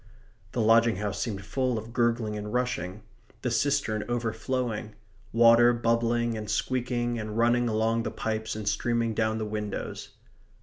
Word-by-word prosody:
The 120 - 0
lodging 115 0 +5
house 105 +1 -3
seemed 100 -5 -3
full 130 +3 0
of 110 +1 -7
gurgling 115 -3 +1
and 105 0 -5
rushing; 115 -6 -2 0.4
the 125 - 0
cistern 115 -3 +1
overflowing; 115 -1 -2 0.4
water 115 +1 +6
bubbling 115 0 +1
and 105 -2 -5
squeaking 120 -2 -1
and 110 0 -5
running 120 +1 +3
along 110 +1 +1
the - - -2
pipes 110 0 -3
and 110 -1 -5
streaming 115 +2 0
down 110 0 0
the 110 - -2
windows. 105 -1 -4
115 Hz, 145 wpm, -28 LUFS, 110-120 Hz, 0.4 s, water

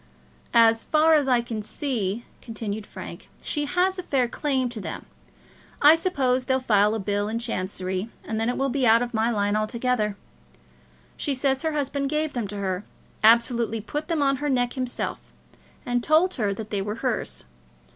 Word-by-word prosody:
"As 225 -1 +5
far 315 +1 +4
as 295 -3 +3
I 250 -2 +4
can 230 -2 -5
see," 225 -2 -2 0.2
continued 215 -2 -5
Frank, - - -9
"she 295 -2 -1
has 365 +5 +1
a - - -1
fair 265 -8 +1
claim 265 0 -1
to 230 -3 -6
them. - - -6 0.7
I 295 +2 +8
suppose 270 -7 +1
they'll 260 0 +2
file 210 -4 +3
a - - -2
bill 205 +1 -1
in 220 +2 -2
Chancery, 185 -2 -3
and 220 0 -3
then 225 - +1
it 245 - -1
will 270 0 +1
be 265 -2 +1
out 230 +2 +6
of 245 0 -5
my 225 +1 +2
line 205 -2 +1
altogether. 215 -1 0 1.0
She 280 - -1
says 265 0 +1
her 320 -1 -1
husband 280 -1 -1
gave 305 0 -1
them 235 -5 -2
to 205 +1 -6
her, 190 -1 -2 0.4
absolutely 230 0 +4
put 295 +8 -4
them 325 -4 +1
on 275 -1 +2
her 295 +2 -2
neck 245 -2 +1
himself, 255 -2 -3 0.7
and 245 -1 0
told 325 +4 +3
her 210 -6 0
that 215 +1 -6
they 200 -2 0
were 210 +2 -3
hers. 235 - -2
240 Hz, 185 wpm, -25 LUFS, 215-275 Hz, 1.0 s, I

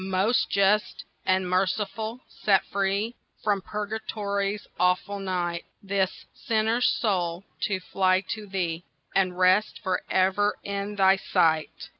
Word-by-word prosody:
"Most 195 +6 +2
Just 200 +2 +2 0.2
and 185 0 +2
Merciful, 205 +5 -1
set 195 -2 +2
free 200 +4 -1 0.3
From 205 -2 +1
Purgatory's 205 -1 -3
awful 180 +3 +1
night 175 -3 -2 0.2
This 195 -1 -1
sinner's 225 0 +1
soul, 180 -5 0 0.2
to 195 -2 -1
fly 185 0 +2
to 215 -2 -4
Thee, 175 -3 -2 0.3
And 185 -2 +1
rest 185 +3 +3
for 185 -2 0
ever 190 +2 +2
in 200 +1 -3
Thy 195 -1 +5
sight." 160 -4 +1
195 Hz, 120 wpm, -26 LUFS, 185-210 Hz, 0.3 s, Thy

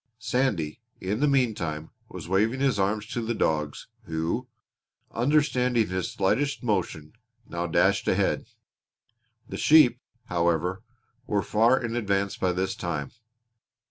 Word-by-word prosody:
Sandy, 110 - -1 0.2
in 100 +4 -2
the 150 - +3
meantime, 105 - 0 0.2
was - - -8
waving 105 +8 +1
his 135 -6 +1
arms 105 +2 0
to 120 +2 -4
the 115 +1 -2
dogs 75 -6 -1 0.2
who, 80 +9 -2 0.6
understanding 125 -3 +2
his 90 -1 -2
slightest 135 +10 0
motion, 90 -8 -2 0.3
now 85 0 -3
dashed 80 - +2
ahead. - - +1 1.0
The - - -6
sheep, 150 -6 +6 0.3
however, 85 +1 0 0.5
were 100 -2 0
far 115 +5 +3
in 120 -1 -3
advance 100 -4 0
by 95 - 0
this 95 +1 -1
time. 80 -6 -4
100 Hz, 125 wpm, -26 LUFS, 85-125 Hz, 1.0 s, sheep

